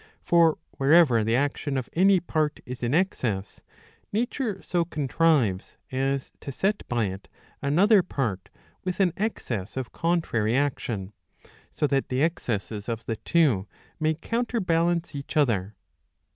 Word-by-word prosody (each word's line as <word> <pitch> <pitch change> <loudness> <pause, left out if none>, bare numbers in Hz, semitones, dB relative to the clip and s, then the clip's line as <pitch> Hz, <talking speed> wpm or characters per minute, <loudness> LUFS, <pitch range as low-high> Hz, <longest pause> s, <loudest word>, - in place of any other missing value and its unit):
For, 170 -2 +4 0.2
wherever 140 -5 +5
the 115 +2 +1
action 140 +1 -1
of 130 - -3
any 190 +2 +5
part 155 -3 -1
is 125 0 -7
in 120 +3 0
excess, 120 - -1 0.5
nature 225 -1 -1
so 175 -1 +1
contrives 150 - +1
as 135 +1 -1
to 140 - -6
set 195 +9 0
by 120 -3 0
it 95 0 -6 0.3
another 190 +9 +5
part 120 - -3 0.3
with 185 0 -3
an 185 -4 +3
excess 125 - -3
of 130 -3 -4
contrary 135 -10 0
action, 115 -8 -2 0.6
so - - -1
that 140 -1 0
the 130 +2 +1
excesses 110 - -2
of 115 0 -4
the 115 - -3
two 135 - +2 0.3
may 155 0 +1
counterbalance 175 -6 0
each 140 +3 -5
other. 105 -8 +1
140 Hz, 135 wpm, -26 LUFS, 115-170 Hz, 0.6 s, wherever